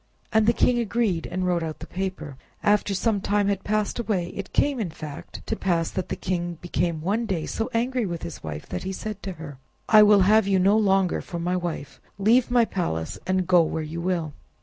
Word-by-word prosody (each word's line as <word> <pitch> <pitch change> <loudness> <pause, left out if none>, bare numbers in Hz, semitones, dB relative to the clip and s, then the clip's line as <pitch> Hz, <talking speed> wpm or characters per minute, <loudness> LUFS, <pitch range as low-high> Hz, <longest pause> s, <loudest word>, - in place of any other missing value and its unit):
And 220 -1 +4
the - - +7
king 240 +1 +2
agreed 220 -6 0
and 185 +2 -2
wrote 175 -1 +1
out 160 -1 -4
the - - -8
paper. 185 -6 -5 0.3
After 205 -1 +2
some 205 0 +1
time 205 +1 +1
had 200 -1 -1
passed 215 +2 -1
away, 200 -7 -1
it 195 - -7
came, 285 -3 +1
in 205 -6 -1
fact, 155 -2 -9
to - - -1
pass, 170 -3 0
that 185 - -3
the - - -2
king 175 -2 -3
became 170 -2 -1
one 210 +7 0
day 175 -6 -1
so 225 - -3
angry 240 0 0
with 170 -2 -5
his 75 -5 -7
wife, 75 -1 -6
that - - -3
he 190 +1 -4
said 210 +1 -6
to 195 - -5
her— 150 -5 -9 0.3
"I 215 -1 +8
will 210 -1 +7
have 210 +2 +4
you 195 -1 +3
no 195 +3 +4
longer 195 -4 +2
for 170 - -6
my 175 +2 -1
wife; 170 -6 -4 0.2
leave 230 +6 +3
my 245 -1 +4
palace, 80 - -3
and 185 0 +1
go 180 -1 +5
where 160 0 -1
you 160 +2 -5
will." 170 -4 -1
185 Hz, 220 wpm, -25 LUFS, 170-210 Hz, 0.3 s, I